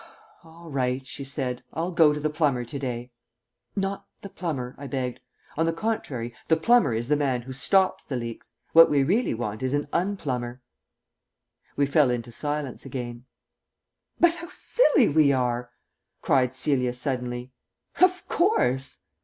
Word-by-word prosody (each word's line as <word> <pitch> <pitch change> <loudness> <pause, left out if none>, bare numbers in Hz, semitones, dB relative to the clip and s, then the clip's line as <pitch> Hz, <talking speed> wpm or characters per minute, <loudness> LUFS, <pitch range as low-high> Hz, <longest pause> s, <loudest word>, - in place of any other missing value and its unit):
"All 165 0 -13
right," 130 -1 -1
she 140 - -7
said, 130 -3 -3
"I'll 170 +3 -2
go 165 -3 +5
to 150 - -2
the 150 0 -1
plumber 145 -6 +1
to 140 +4 -6
day." 125 -2 -4 0.6
"Not 195 0 -2 0.2
the 200 - -7
plumber," 135 -10 -4
I 140 - -6
begged. 130 -3 -3 0.4
"On 160 - +1
the 165 - +1
contrary. 145 - -3
The 160 - +4
plumber 235 - +4
is 115 +1 -2
the 150 - +3
man 135 -4 0
who 130 +2 -7
stops 185 +8 +2
the 135 - -5
leaks. 115 -2 -6 0.2
What 165 0 +9
we 140 -2 +3
really 200 - +1
want 110 -1 -4
is 130 +2 0
an 145 0 -1
unplumber." 130 -10 -2 1.1
We 140 - +3
fell 140 -1 +4
into 120 -1 -2
silence 145 +1 -3
again. 120 -2 -6 0.9
"But 345 -1 +5
how 340 0 -8
silly 390 - +3
we 145 -1 +4
are!" 125 -1 0 0.5
cried 130 -2 +2
Celia 130 -2 +1
suddenly. 125 -1 -3 0.5
"Of 365 0 +4
course!" 135 - +1
135 Hz, 155 wpm, -26 LUFS, 125-165 Hz, 1.1 s, What